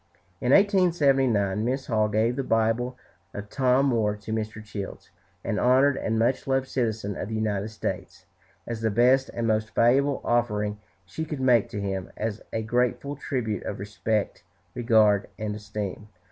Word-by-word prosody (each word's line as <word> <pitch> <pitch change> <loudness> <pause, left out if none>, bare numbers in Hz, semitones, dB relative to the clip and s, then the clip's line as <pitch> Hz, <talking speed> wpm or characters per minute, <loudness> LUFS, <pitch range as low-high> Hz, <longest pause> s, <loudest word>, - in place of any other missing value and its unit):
In 125 - +1
1879 135 - +3
Mrs. 130 +3 -1
Hall 110 -2 +1
gave 110 +3 +1
the 135 - -2
Bible 115 +2 0 0.4
of 105 0 -7
Tom 130 0 +3
Moore 110 -6 +1
to 105 +1 -6
Mr. 110 -1 -4
Childs, 100 -2 -7 0.3
"an 105 -2 -1
honored 130 +3 +4
and 115 -3 -1
much 120 +5 +1
loved 135 0 +1
citizen 110 -6 -2
of 100 - -5
the 110 - -3
United 105 -2 -1
States, 110 0 -5 0.4
as 115 -2 -5
the 110 - +1
best 125 +5 +3
and 115 - -3
most 110 0 0
valuable 135 +4 +3
offering 105 -3 0 0.3
she 125 - -5
could 150 -3 -5
make 125 -4 +3
to 105 - -5
him, 95 -2 -3
as 110 0 -3
a 110 - -2
grateful 125 +5 0
tribute 125 -7 -3
of - - -5
respect, 105 +1 -2 0.3
regard, 110 -4 +3
and 110 -1 -3
esteem." 105 -1 -6
115 Hz, 160 wpm, -26 LUFS, 105-130 Hz, 0.4 s, honored